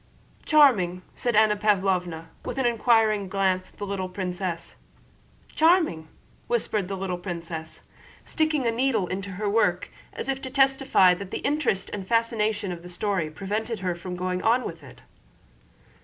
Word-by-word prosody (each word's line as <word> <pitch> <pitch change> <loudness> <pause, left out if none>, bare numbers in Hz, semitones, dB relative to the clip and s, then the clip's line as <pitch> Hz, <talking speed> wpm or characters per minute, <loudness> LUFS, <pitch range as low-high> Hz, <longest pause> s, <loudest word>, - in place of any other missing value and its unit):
"Charming!" 205 - +4
said 240 -3 -1
Anna 215 0 +5
Pávlovna 190 -5 0 0.2
with - - -5
an 265 - +1
inquiring 225 -4 +2
glance 185 -1 0
at - - -26
the 205 - -4
little 195 -2 -3
princess. 180 -2 -4 0.8
"Charming!" 320 - +2 0.4
whispered 215 -5 0
the 195 0 -4
little 185 -2 -3
princess, 165 -3 -6 0.4
sticking 310 -3 0
the 230 - +2
needle 230 -4 +1
into 195 +2 -5
her 205 +3 -3
work 190 -4 +1 0.2
as - - -5
if 270 0 -2
to 260 - -5
testify 270 -8 +4
that 190 +1 -6
the - - -5
interest 280 -10 0
and 195 -2 -5
fascination 220 -3 0
of 170 -1 -6
the 180 - -10
story 180 -3 -1
prevented 210 +6 -4
her 180 -2 -1
from 180 +1 -7
going 180 0 -2
on 240 +3 +3
with 165 -1 -6
it. 140 -3 -15
200 Hz, 155 wpm, -25 LUFS, 180-230 Hz, 0.8 s, Anna